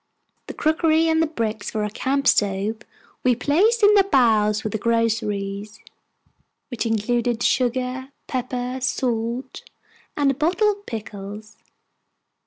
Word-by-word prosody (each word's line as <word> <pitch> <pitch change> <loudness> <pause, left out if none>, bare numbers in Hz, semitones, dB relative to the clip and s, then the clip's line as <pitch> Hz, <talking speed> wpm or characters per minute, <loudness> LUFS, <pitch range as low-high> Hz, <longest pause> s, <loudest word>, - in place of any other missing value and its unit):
The - - -7
crockery 315 +1 +2
and 320 0 +2
the 325 - +2
bricks 225 -8 -3
for 215 -1 -2
our 210 - -1
camp 275 +5 -1
stove 205 0 +2 0.5
we 250 -1 +3
placed 390 - +2
in 410 +1 +7
the 400 -1 +6
bows, 220 - +3
with 215 - -3
the 220 - -1
groceries, 215 -2 -1 0.9
which 245 -2 -3
included 235 +2 0
sugar, 255 +1 0 0.2
pepper, 250 0 -3
salt, 245 0 -2 0.6
and 285 -2 +3
a - - -1
bottle 355 - +2
of 405 0 -10
pickles. 210 -1 -7
245 Hz, 130 wpm, -22 LUFS, 215-280 Hz, 0.9 s, in